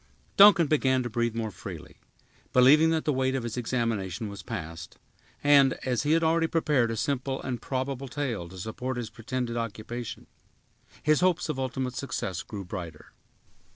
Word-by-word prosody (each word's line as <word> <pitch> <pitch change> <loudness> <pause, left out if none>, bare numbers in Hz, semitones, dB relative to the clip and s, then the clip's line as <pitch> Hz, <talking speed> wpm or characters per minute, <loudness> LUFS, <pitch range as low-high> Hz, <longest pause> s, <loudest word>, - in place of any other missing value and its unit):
Duncan 200 -4 +8
began 130 -4 +2
to 120 - -5
breathe 120 0 0
more 110 -2 -2
freely, 90 - -9 0.6
believing 145 +6 +6
that 160 -1 0
the 150 - +2
weight 130 0 0
of 130 - -2
his 120 -2 -4
examination 115 -5 -2
was 100 - -8
past; 80 -1 -7 0.5
and, 140 -2 +6
as 125 -2 0
he 150 +1 +2
had 165 0 +3
already 165 0 +3
prepared 150 -8 +1
a 115 - -3
simple 135 +1 -1
and 125 -3 -4
probable 135 0 -3
tale 120 - -3
to 95 - -11
support 120 +6 -4
his 115 -3 -5
pretended 120 +1 -4
occupation, 115 +1 -5 0.8
his 155 0 +4
hopes 180 -2 +1
of 140 -3 -2
ultimate 130 -1 -2
success 100 -9 -3
grew 100 -3 -7
brighter. 85 -5 -8
125 Hz, 165 wpm, -27 LUFS, 110-140 Hz, 0.8 s, Duncan